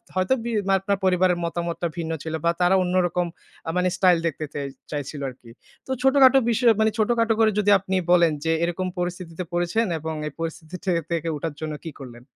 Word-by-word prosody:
হয়তো 185 +6 +2
বি 235 - -3 0.3
আপনার 200 +1 -1
পরিবারের 180 -1 +3
মতামতটা 170 0 -2
ভিন্ন 165 -1 -3
ছিল, 160 - -5
বা 170 - +4
তারা 180 +2 +4
অন্যরকম 180 -1 +1 0.4
আ - - -1
মানে 180 0 +2
স্টাইল 180 -3 +5
দেখতে 155 -1 -3
চাই 140 -1 -3 0.2
চাইছিল 145 0 -4
আরকি। 125 -2 -15 0.4
তো - - -5
ছোটখাটো 265 0 +6
বিষয় 235 +1 +4
মানে 220 0 +3
ছোটখাটো 230 +1 +2
করে 220 -1 +5
যদি 205 0 +3
আপনি 190 0 -3 0.2
বলেন 170 -2 +5
যে 160 - +2
এরকম 175 +2 -1
পরিস্থিতিতে 180 -1 -4
পড়েছেন 175 +6 +1
এবং 160 +1 -4
এই 150 - -7
পরিস্থিতি 165 +1 -5
থেকে 170 -3 0 0.2
উঠার 160 0 -4
জন্য 155 -1 -4
কী 165 - -6
করলেন? 120 -2 -10
175 Hz, 185 wpm, -24 LUFS, 165-195 Hz, 0.4 s, ছোটখাটো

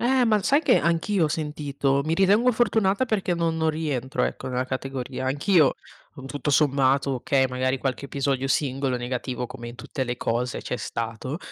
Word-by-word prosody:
Eh, 255 +1 +3
ma 215 -3 +2
sai 285 +8 +3
che - - +4
anch'io 170 +2 +1
ho - - +1
sentito? 145 -3 -1
Mi 160 +1 0
ritengo 205 +7 +4
fortunata 220 -2 +2
perché 195 -6 0
non 165 -1 0
non 160 0 +2
rientro 145 -5 -2
ecco - - -4
nella 125 0 -1
categoria. 130 0 -4
Anch'io, 145 +2 +3 0.4
con 135 -1 -10
tutto 145 +2 -3
sommato 140 -1 +3
okay, 135 0 +1
magari 130 +1 -1
qualche 135 +1 -3
episodio 135 -1 -1
singolo 135 -1 0
negativo, 125 0 -3
come 120 0 -8
in 120 - -10
tutte 135 - -5
le 125 -1 -2
cose 120 +1 -2
c'è - - -4
stato, 115 +6 -4
140 Hz, 175 wpm, -25 LUFS, 130-165 Hz, 0.4 s, che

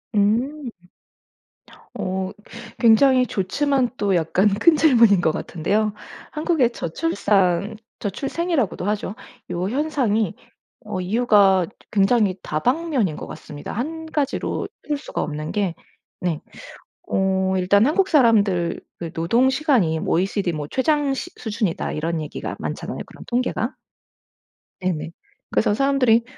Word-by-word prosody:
음. 245 +8 +1 1.3
어 190 0 -2 0.5
굉장히 250 +3 +5
좋지만 260 +7 0
또 200 -2 +1
약간 175 +4 +2
큰 315 - +4
질문인 235 - +5
것 160 - +2
같은데요. 205 +8 -1 0.4
한국의 305 -6 +1
저출산 200 - 0 0.2
저출생이라고도 270 - -2
하죠. 205 -1 -2 0.4
요 180 +2 -2
현상이 245 - 0 0.5
어 185 - -4
이유가 200 -2 +4 0.3
굉장히 200 -1 +3
다방면인 250 - 0
것 - - -7
같습니다. 150 -1 -8
1 320 +8 -4
가지로 285 -2 -1 0.2
쓸 295 - 0
수가 285 - -5
없는 150 +1 -4
게 195 -5 -1 0.4
네. 170 -4 -2 0.7
어 190 0 +1
일단 200 +4 +4
"한국 375 +6 +2
사람들의 205 - +3 0.3
노동 230 +11 +2
시간이 255 - +2
OECD 190 +2 0
뭐 150 -2 -4
최장 290 +1 +1
시 270 - -5
수준이다." 215 -6 -2
이런 160 +1 -2
얘기가 150 - -5
많잖아요 - - -5
그런 - - -13
통계가. 245 0 -1 1.1
네네. 170 -3 -2 0.4
그래서 205 - +2
사람들이 255 -3 +3
210 Hz, 260 characters per minute, -22 LUFS, 185-265 Hz, 1.3 s, 굉장히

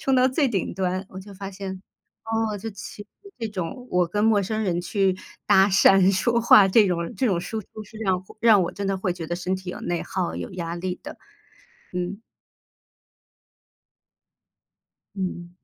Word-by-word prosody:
冲 270 - +1
到 255 0 +5
最 265 +1 +2
顶 200 -6 -2
端。 185 +1 -2
我 190 - -8
就 200 +1 -12
发 195 +1 -7
现， 190 -1 -7 0.4
哦， 225 -1 -1
就 225 +3 -6
其 200 +1 -9
实 205 - -23 0.3
这 230 - -2
种， 210 +6 -5
我 180 -1 +2
跟 205 +4 0
陌 215 -3 +4
生 220 +3 -2
人 175 -3 0
去 190 +1 +1 0.3
搭 195 +1 +6
讪、 195 0 +6
说 235 +5 +2
话 215 -4 +7
这 205 +2 +5
种 170 -2 -2
这 265 - 0
种 190 -6 +1
输 215 +5 -4
出 215 +2 -11
是 220 +2 -13
让 190 -4 0 0.2
让 220 -4 +6
我 170 - -3
真 200 -1 -4
的 195 0 0
会 185 -1 -1
觉 170 -2 -7
得 175 +2 -3
身 185 +1 -2
体 185 -1 -7
有 - - -5
内 175 -1 -2
耗， 185 -2 -3
有 - - -5
压 170 -1 -4
力 180 +1 -4
的。 - - -9 0.8
嗯。 180 +3 -3 3.0
嗯。 180 -3 -4
195 Hz, 195 characters per minute, -24 LUFS, 180-215 Hz, 3.0 s, 话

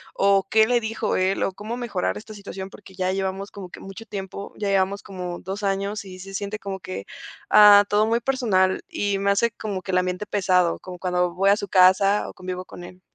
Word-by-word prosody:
o 195 -1 +3
qué 220 0 +5
le 245 -1 +3
dijo 220 -1 -2
él, 190 +1 +1
o - - 0
cómo 220 +5 -6
mejorar 225 -7 -2
esta 215 0 -10
situación, 195 -1 -8
porque 190 -2 -14
ya 185 0 0
llevamos 195 +1 -3
como 190 -3 -9
que - - -11
mucho 195 +4 -9
tiempo, 200 0 -6
ya 205 -1 -2
llevamos 195 +1 +1
como 180 -3 -6
dos 195 +3 -5
años 200 +1 -2
y 185 -1 -10
se 195 +1 -10
siente 200 +2 -3
como 195 -2 -6
que, 95 - -7 0.5
ah, 205 -1 +8
todo 210 +1 +2
muy 230 +1 +2
personal 220 -8 +1
y 200 -1 -1
me 200 - +1
hace 215 +4 +2
como 200 -4 -5
que 190 - -4
el 185 - +3
ambiente 180 +3 -2
pesado, 185 -4 +1
como 180 -1 -9
cuando 180 -1 -1
voy 195 +2 +4
a 200 - +5
su 200 - -5
casa 190 +2 +4
o - - -10
convivo 185 0 -6
con 175 - -11
él. 180 +1 -12
195 Hz, 225 wpm, -23 LUFS, 185-205 Hz, 0.5 s, ah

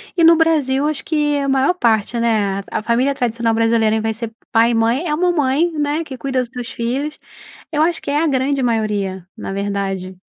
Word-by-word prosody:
e 340 - +2
no 335 +1 +8
Brasil 295 -4 +2
acho 305 -2 -2
que 295 -2 0
a 275 -1 -1
maior 270 +6 +3
parte, 235 - +1
né, 210 -4 +1
a - - -2
família 250 +5 +1
tradicional 230 -2 0
brasileira, 225 -1 +2
vai 220 0 -1
ser 225 +1 -5 0.2
pai 230 +1 +4
e - - 0
mãe 230 +9 +1
é 300 - 0
uma 355 +2 +2
mãe, 300 +2 +1
né, 295 +2 0
que 280 -4 -8
cuida 265 0 -2
dos 250 -2 -2
seus 245 -2 -5
filhos, 270 +6 -3 0.6
eu 300 -1 +1
acho 335 +1 +2
que - - -4
é 295 - +1
a 330 - +2
grande 275 0 0
maioria, 205 -6 -1
na - - -6
verdade. 195 -2 -3
250 Hz, 210 wpm, -19 LUFS, 225-295 Hz, 0.6 s, no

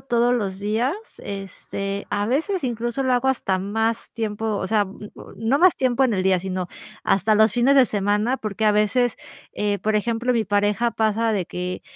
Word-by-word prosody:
todos 240 -1 +1
los 195 -5 -2
días, 220 - 0 0.3
este, 195 0 -5
a 205 0 -1
veces 320 - -1
incluso 240 +2 -2
lo 260 -1 +1
hago 250 +2 +2
hasta 195 -7 0
más 225 +4 -2
tiempo, 220 -1 -2
o 190 - -2
sea, 210 -1 +2
mm, 190 - -12 0.4
no 225 +7 +1
más 370 +1 +5
tiempo 255 0 +1
en 235 -5 +1
el 185 - 0
día, 190 -1 +3
sino 185 0 -3 0.4
hasta 210 +3 +3
los 220 +1 +4
fines 255 +3 +3
de 265 - +7
semana, 210 +4 0
porque 215 0 -3
a 210 - +5
veces, 225 +4 +2 0.4
eh, 205 -1 -1
por 215 0 0
ejemplo, 235 +3 0
mi 230 -2 +1
pareja 205 +3 +1
pasa 220 0 +1
de 195 -4 0
que, 180 +1 -5
220 Hz, 190 wpm, -23 LUFS, 200-240 Hz, 0.4 s, de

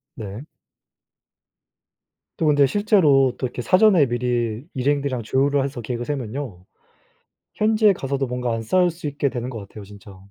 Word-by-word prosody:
네. 105 0 -7 2.0
또 165 - -1
근데 145 -2 +4
실제로 150 - +3
또 - - -3
이렇게 125 - -6
사전에 185 - +4
미리 120 -1 -2
일행들이랑 135 -2 -1
조율을 140 +4 +1
해서 135 -3 -5
계획을 120 +1 -4
세우면요, 125 -8 -5 0.9
현지에 215 -1 +3
가서도 135 -4 -3
뭔가 125 -1 -2
안 115 - -3
싸울 180 +10 +2
수 165 -2 -7
있게 140 0 -1
되는 125 0 -5
것 115 - -6
같아요, 100 +1 -11
진짜. 100 0 -14
130 Hz, 320 characters per minute, -22 LUFS, 120-145 Hz, 2.0 s, 근데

